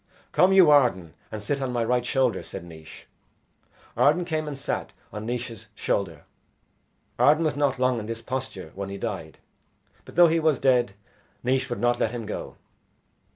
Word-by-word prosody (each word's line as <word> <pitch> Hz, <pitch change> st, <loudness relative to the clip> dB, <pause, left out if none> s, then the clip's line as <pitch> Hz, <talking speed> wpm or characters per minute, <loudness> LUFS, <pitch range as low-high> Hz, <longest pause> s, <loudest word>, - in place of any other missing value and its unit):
"Come 185 Hz, +1 st, +4 dB
you, 185 Hz, -5 st, +7 dB
Arden, 105 Hz, -, +3 dB, 0.2 s
and 110 Hz, -1 st, -6 dB
sit 140 Hz, +6 st, -2 dB
on 130 Hz, -2 st, -2 dB
my 120 Hz, -1 st, 0 dB
right 125 Hz, +1 st, +1 dB
shoulder," 130 Hz, -1 st, +1 dB
said 95 Hz, -, -8 dB
Naois. 80 Hz, -2 st, -12 dB, 0.9 s
Arden 170 Hz, +5 st, +3 dB
came 155 Hz, -2 st, -2 dB
and 145 Hz, -2 st, -5 dB
sat 140 Hz, -, -4 dB, 0.2 s
on 105 Hz, +1 st, -6 dB
Naois's 115 Hz, -3 st, -5 dB
shoulder. 85 Hz, -9 st, -2 dB, 1.0 s
Arden 155 Hz, +3 st, +5 dB
was 150 Hz, -2 st, 0 dB
not 145 Hz, -2 st, +1 dB
long 125 Hz, -1 st, +1 dB
in 105 Hz, -, -6 dB
this 115 Hz, 0 st, -5 dB
posture 130 Hz, -10 st, -5 dB
when 100 Hz, 0 st, -5 dB
he 100 Hz, -, -5 dB
died; -, -, -5 dB, 0.7 s
but -, -, -14 dB
though 175 Hz, -, +8 dB
he 165 Hz, +1 st, +2 dB
was 155 Hz, -3 st, +2 dB
dead 125 Hz, -6 st, +2 dB, 0.5 s
Naois 130 Hz, +1 st, 0 dB
would 120 Hz, -, -3 dB
not 120 Hz, 0 st, +1 dB
let 115 Hz, -, 0 dB
him 120 Hz, -2 st, -5 dB
go. 105 Hz, -, -6 dB
125 Hz, 175 wpm, -25 LUFS, 110-145 Hz, 1.0 s, though